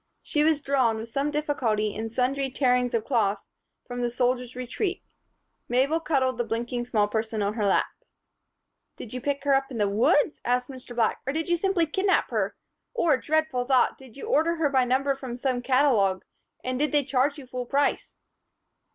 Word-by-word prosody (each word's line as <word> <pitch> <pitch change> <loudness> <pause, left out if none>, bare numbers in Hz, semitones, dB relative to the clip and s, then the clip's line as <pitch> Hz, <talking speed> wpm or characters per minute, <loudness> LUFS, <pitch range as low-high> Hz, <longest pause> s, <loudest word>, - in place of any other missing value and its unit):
She 295 - +1
was 310 -1 +2
drawn, 260 -6 +1
with 225 +1 -7
some 275 +5 -1
difficulty 245 -9 -1
and 225 +1 -4
sundry 265 +3 0
tearings 250 -2 +1
of 225 - -1
cloth, 215 -6 +1 0.5
from 245 0 -5
the 240 - 0
"Soldier's 250 0 -1
Retreat." 260 - -3 0.7
Mabel 270 +6 +2
cuddled 265 -6 0
the - - +2
blinking 235 +1 -3
small 210 -4 +2
person 220 0 -2
in 200 +1 0
her 215 -2 0
lap. 195 - +3 1.1
"Did 230 - -9
you 255 - -4
pick 280 +1 -2
her 285 -1 +3
up 270 0 +1
in 250 - -6
the 205 -2 +2
woods?" 230 +9 +2
asked 250 +2 0
Mr. 250 -2 -9
Black, 230 -2 +1
"or 270 - 0
did 320 +2 -2
you 345 - +4
simply 360 -1 +1
kidnap 380 +5 +1
her? - - -1 0.4
Or, 335 - +3
dreadful 300 0 0
thought! 255 -1 +2
Did 265 -2 -14
you - - -7
order 330 +3 +2
her 320 -3 +1
by 260 -2 +3
number 270 +3 +1
from 260 -3 -7
some 250 -1 -1
catalogue? 245 -8 +2 0.4
And 255 0 -2
did 300 +1 +1
they 295 -2 +3
charge 275 +2 +1
you 280 - -9
full 250 -1 -5
price?" 280 +2 0
255 Hz, 190 wpm, -26 LUFS, 240-285 Hz, 1.1 s, you